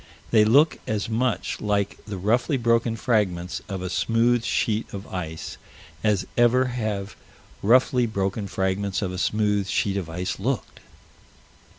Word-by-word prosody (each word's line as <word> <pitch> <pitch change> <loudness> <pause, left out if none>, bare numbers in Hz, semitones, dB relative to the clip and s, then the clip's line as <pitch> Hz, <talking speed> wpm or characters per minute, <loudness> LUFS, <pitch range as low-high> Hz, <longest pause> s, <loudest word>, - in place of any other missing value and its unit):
They 110 -2 +6
look 140 +9 +4
as 110 0 -2
much 120 +2 -1
like 100 -1 -1
the 105 -2 -5
roughly 120 - +1
broken 115 -1 +2
fragments 95 -8 0
of 95 -2 -4
a 90 - -3
smooth 115 +4 +2
sheet 110 -1 0
of 100 +1 -7
ice 80 -3 -5 0.5
as 105 -3 +2
ever 120 +2 +4
have 105 -4 -3 0.5
roughly 125 +2 +4
broken 100 -1 -2
fragments 95 +1 -1
of 95 - -2
a 90 - -5
smooth 105 -1 +1
sheet 100 0 0
of 90 -4 -4
ice 90 +3 -3
looked. 125 +4 -3
105 Hz, 145 wpm, -24 LUFS, 95-115 Hz, 0.5 s, They